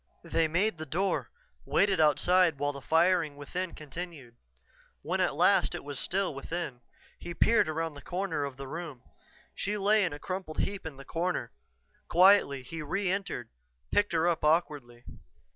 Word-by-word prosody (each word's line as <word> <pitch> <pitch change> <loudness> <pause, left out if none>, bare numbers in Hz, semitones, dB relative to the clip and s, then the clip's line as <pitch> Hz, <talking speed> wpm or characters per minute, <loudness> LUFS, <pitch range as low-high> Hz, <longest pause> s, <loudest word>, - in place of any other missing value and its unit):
They 165 -1 +1
made 175 +3 0
the 155 - -6
door, 190 +8 -1 0.3
waited 195 -3 +2
outside 165 +2 +4
while 145 +1 0
the 140 - -8
firing 165 0 +2
within 175 +5 -5
continued. 150 -5 -8 0.7
When - - -1
at - - +1
last - - +3
it - - -6
was 145 -3 -5
still 190 +2 0
within, 140 -2 -5 0.4
he 175 0 -7
peered 230 -6 +3
around 165 0 -2
the 145 - -11
corner 180 -5 -2
of 140 -2 -5
the 135 0 -7
room. 155 -4 -7 0.5
She 205 +2 -2
lay 210 +1 +3
in 180 - 0
a 145 - -6
crumpled 185 -1 -5
heap 195 -4 -2
in 145 -4 -9
the 140 - -11
corner; 165 -8 -2 0.6
quietly 180 -7 +5
he 165 +5 -7
re 190 +5 -1
entered, 190 - -3 0.4
picked 205 -3 +2
her 165 +1 +2
up 170 -2 0
awkwardly. 145 -7 0
165 Hz, 165 wpm, -29 LUFS, 145-185 Hz, 0.7 s, quietly